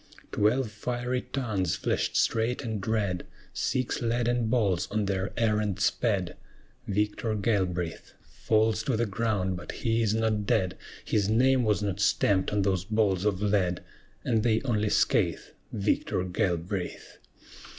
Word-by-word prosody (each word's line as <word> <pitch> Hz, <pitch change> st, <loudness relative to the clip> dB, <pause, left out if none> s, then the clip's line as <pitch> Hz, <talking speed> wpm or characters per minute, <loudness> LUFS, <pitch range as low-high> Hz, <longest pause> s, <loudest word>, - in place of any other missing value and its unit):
Twelve 110 Hz, +3 st, +1 dB
fiery 125 Hz, +3 st, -2 dB
tongues 105 Hz, -10 st, -1 dB
flashed -, -, -1 dB
straight 115 Hz, +4 st, +1 dB
and 110 Hz, -4 st, -4 dB
red, 100 Hz, -5 st, 0 dB, 0.3 s
Six 130 Hz, -2 st, -1 dB
leaden 120 Hz, 0 st, +1 dB
balls 105 Hz, -7 st, +1 dB
on 105 Hz, -1 st, 0 dB
their 95 Hz, 0 st, -1 dB
errand 105 Hz, -4 st, +1 dB
sped; -, -, 0 dB, 0.5 s
Victor 105 Hz, +2 st, -1 dB
Galbraith 95 Hz, -6 st, -1 dB
Falls 110 Hz, 0 st, +1 dB
to 115 Hz, 0 st, -1 dB
the 120 Hz, -, +1 dB
ground, 100 Hz, -4 st, -1 dB
but 85 Hz, -, -7 dB
he 115 Hz, -1 st, 0 dB
is 110 Hz, -1 st, +1 dB
not 110 Hz, -2 st, 0 dB
dead: 90 Hz, -1 st, +1 dB, 0.3 s
His 105 Hz, -1 st, +1 dB
name 130 Hz, +4 st, +4 dB
was 105 Hz, -2 st, +1 dB
not 100 Hz, -1 st, -2 dB
stamped 100 Hz, -1 st, +2 dB
on 105 Hz, -1 st, +1 dB
those 95 Hz, -2 st, +1 dB
balls 105 Hz, -3 st, +1 dB
of 100 Hz, -1 st, 0 dB
lead, 95 Hz, -4 st, +1 dB, 0.4 s
And 115 Hz, -3 st, +2 dB
they 110 Hz, +1 st, +1 dB
only 110 Hz, -5 st, 0 dB
scath -, -, +1 dB, 0.2 s
Victor 100 Hz, -3 st, 0 dB
Galbraith. 90 Hz, 0 st, -3 dB
105 Hz, 140 wpm, -28 LUFS, 95-115 Hz, 0.5 s, name